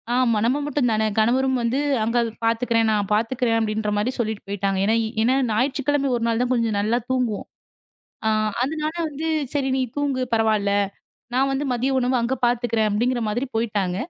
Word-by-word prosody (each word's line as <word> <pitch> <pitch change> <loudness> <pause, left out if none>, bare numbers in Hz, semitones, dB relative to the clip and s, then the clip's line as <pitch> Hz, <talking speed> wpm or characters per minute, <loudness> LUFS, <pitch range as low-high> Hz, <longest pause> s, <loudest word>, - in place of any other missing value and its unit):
ஆமா 245 -3 +3
நம்ம 260 +4 +2
மட்டும் 290 -4 0
தான 220 0 +1 0.2
கணவரும் 260 +3 +2
வந்து 235 +4 0 0.2
அங்க 230 +2 +1 0.3
பாத்துக்குறேன். 230 0 +2
நான் 205 -2 0
பாத்துக்குறேன் 230 +1 +1
அப்படின்ற 215 -1 -1
மாதிரி 225 +5 0
சொல்லிட்டு 220 -3 -2
போயிட்டாங்க 195 -1 -1
ஏன்னா-ஏன்னா 225 +3 +1 0.2
ஞாயிற்றுக்கிழமை 275 +4 +1
ஒரு 235 - -2
நாள் 230 +1 +1
தான் 250 0 0
கொஞ்சம் 230 -4 0
நல்லா 225 +4 +1
தூங்குவோம். 250 -5 -1 0.8
அ - - +4 0.4
அதனால 310 +3 -3
வந்து 305 +2 -4 0.3
சரி 270 -2 0
நீ 260 - +1
தூங்கு 275 -3 0
பரவால்ல 215 -2 +2 0.6
நான் 270 +1 +2
வந்து 270 +2 -1
மதிய 255 +3 0
உணவு 250 +1 +1
அங்க 250 +3 0
பாத்துக்குறேன் 235 -2 +1
அப்படிங்கற 240 +3 0
மாதிரி 240 +6 -1
போயிட்டாங்க. 205 -5 -1
235 Hz, 160 wpm, -23 LUFS, 220-260 Hz, 0.8 s, அ